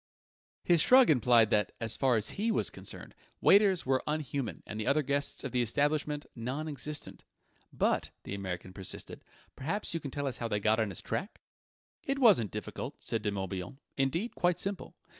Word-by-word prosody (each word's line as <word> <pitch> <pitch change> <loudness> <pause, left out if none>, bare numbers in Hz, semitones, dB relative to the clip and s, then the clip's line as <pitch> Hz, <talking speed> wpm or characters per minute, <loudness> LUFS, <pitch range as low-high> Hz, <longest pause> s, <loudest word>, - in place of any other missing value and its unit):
His 170 -3 +4
shrug 255 -2 +7
implied 120 -4 +4
that, 105 -2 +2
as 115 -1 -2
far 130 -4 +3
as 105 - -2
he 225 +3 0
was - - 0
concerned, - - -8 0.3
waiters 195 -3 +5
were 130 0 +2
unhuman 145 -5 -3
and 105 - -6
the 110 - -3
other 150 +2 +3
guests 140 +1 -1
of 135 - -4
the 125 - +1
establishment 145 +4 0
non 130 +6 -3
existent. 150 0 -5 0.5
"But," - - +1
the - - -6
American 95 -2 -5
persisted, 95 0 -7 0.3
"perhaps 165 +10 -3
you 165 - -1
can 140 - -6
tell 145 +2 -3
us 130 -2 -3
how 115 - -2
they 105 -2 -1
got 110 +2 +2
on 110 -2 +1
his 95 - -6
track?" 195 - -4 0.6
"It 275 -3 -1
wasn't 205 - +5
difficult," - - -5
said 115 - -2
De 105 - 0
Morbihan: 95 +2 -4 0.2
"indeed, 165 - 0
quite 175 -1 +1
simple. 200 0 -3
135 Hz, 180 wpm, -31 LUFS, 110-155 Hz, 0.6 s, shrug